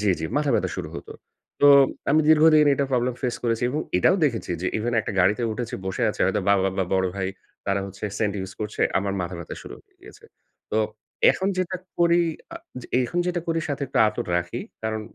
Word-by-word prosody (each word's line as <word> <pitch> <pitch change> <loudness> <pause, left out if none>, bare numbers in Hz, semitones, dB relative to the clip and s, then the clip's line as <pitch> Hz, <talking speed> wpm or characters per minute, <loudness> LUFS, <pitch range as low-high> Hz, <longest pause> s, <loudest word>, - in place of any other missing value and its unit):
জি, 105 -2 +2
জি, - - -2
মাথাব্যথা 145 -4 +1
শুরু - - -4
হতো। - - -8 0.5
তো 145 - +6 0.4
আমি 155 +2 +5
দীর্ঘদিন 155 -1 +6
এটা 140 - 0
প্রবলেম 125 0 +1
ফেস 125 -2 -1
করেছি। 115 -1 0
এবং 150 +3 -1 0.2
এটাও 185 - +4
দেখেছি 120 -9 -1
যে, - - 0
ইভেন 120 +2 -2
একটা 110 - -5
গাড়িতে 105 +6 +2
উঠেছি, 120 +1 -4
বসে 95 - -3
আছে। - - -10
হয়তো 105 - +1
বা - - +6
বা 95 - +1
বা 95 - +2
বড় 95 0 +2
ভাই, 95 -1 -1 0.4
তারা 100 0 +1
হচ্ছে 100 +2 -9
সেন্ট 105 -2 0
ইউজ 95 0 -6
করছে। 105 0 -5 0.2
আমার 100 0 -2
মাথাব্যথা 85 -1 -5
শুরু - - -9
হয়ে - - -40
গিয়েছে। - - -15 0.5
তো 110 - +1 0.5
এখন 190 +1 -1
যেটা 185 0 -1 0.2
করি, 170 0 +4 0.3
আ - - -5 0.2
যে - - -11 0.2
এখন 175 +8 -2
যেটা 175 -1 -1
করি 165 0 +1
সাথে 140 0 -3
একটু 130 - -2
আতর 105 - -4
রাখি। 85 0 -3 0.2
কারণ 110 0 -2
115 Hz, 205 wpm, -24 LUFS, 100-150 Hz, 0.5 s, তো